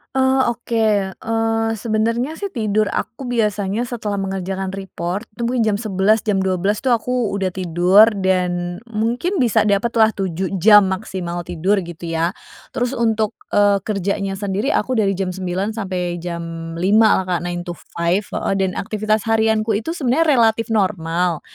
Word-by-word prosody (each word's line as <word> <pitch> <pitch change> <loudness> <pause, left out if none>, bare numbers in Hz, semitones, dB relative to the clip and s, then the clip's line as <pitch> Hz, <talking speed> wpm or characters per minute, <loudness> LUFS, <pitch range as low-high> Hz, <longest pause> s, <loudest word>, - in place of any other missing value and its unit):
Oh, 265 -2 +3
oke, 235 0 -4 0.3
eee, 225 +2 -1
sebenernya 230 +7 -1
sih 400 -4 -5
tidur 215 -2 +1
aku 240 +5 -4
biasanya 210 -3 0
setelah 235 -4 -3
mengerjakan 190 0 -3
report 190 +1 -5
itu 235 - -9
mungkin 235 -1 +1
jam - - 0
11.00 210 +1 +2
jam 210 -3 0
12.00 190 +2 0
itu 250 - +4
aku 235 -2 -1
udah 195 -2 0
tidur 180 +3 +4 0.2
dan 180 -1 0
mungkin 235 - -1
bisa 225 -3 +3
dapet 205 +3 +2
lah 220 0 +5
7 190 0 -3
jam 210 -1 +7
maksimal 185 -3 -3
tidur 185 +4 0
gitu 170 -1 -7
ya. 165 +1 +1 0.4
Terus 245 +2 -2
untuk, 225 -2 0 0.2
eee, 205 -1 +3
kerjanya 195 -1 -2
sendiri 205 +5 -1
aku 255 0 0
dari 200 -5 +1
jam 185 -2 -2
9.00 190 +3 -3
sampai 180 -5 -3
jam 165 -1 -6
5.00 210 +5 +4
lah 190 - -2
Kak, 170 - 0
9 175 0 -4
to 175 - -4
5, 170 +3 -1
heeh, 195 - -3
dan 190 -1 -1
aktivitas 215 0 -1
harianku 220 -1 +2
itu 275 +12 -2
sebenernya 300 +4 +2
relatif 230 -4 +3
normal. 180 -5 0
205 Hz, 160 wpm, -20 LUFS, 185-225 Hz, 0.4 s, jam